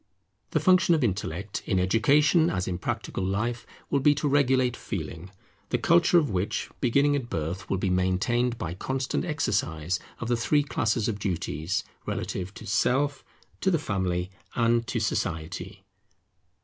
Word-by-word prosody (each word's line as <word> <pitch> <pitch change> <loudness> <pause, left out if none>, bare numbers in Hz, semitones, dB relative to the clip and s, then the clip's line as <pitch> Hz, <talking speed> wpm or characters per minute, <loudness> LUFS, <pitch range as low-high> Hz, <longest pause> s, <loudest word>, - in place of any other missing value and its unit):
The - - +1
function 185 -2 +5
of 155 - 0
Intellect, 95 -2 -2
in 95 - +1
education 140 - +4
as 90 0 -2
in 90 -1 -2
practical 95 - -3
life, 110 +5 -2 0.2
will 140 - +3
be 145 +2 +4
to 145 - -1
regulate 130 -3 +3
Feeling; 85 -4 -6 0.4
the - - +1
culture 170 +7 +4
of 150 -8 +2
which, 95 +2 -2
beginning 140 +3 +3
at 130 -4 -3
birth, 85 +4 -3
will 95 - +1
be 95 0 0
maintained 110 +7 +1
by 85 -5 -4
constant 130 +8 -2
exercise 95 - -1 0.2
of 115 - -4
the 120 - +2
three 145 +5 +2
classes 110 -5 0
of 105 -3 -2
duties 90 -1 -2 0.2
relative 95 0 -3
to - - -9
Self, 135 +7 +1 0.4
to 190 - +1
the 175 - +3
Family, 95 - -2 0.2
and 115 0 +2
to 115 - -1
Society. 80 -6 -3
115 Hz, 155 wpm, -27 LUFS, 95-140 Hz, 0.4 s, function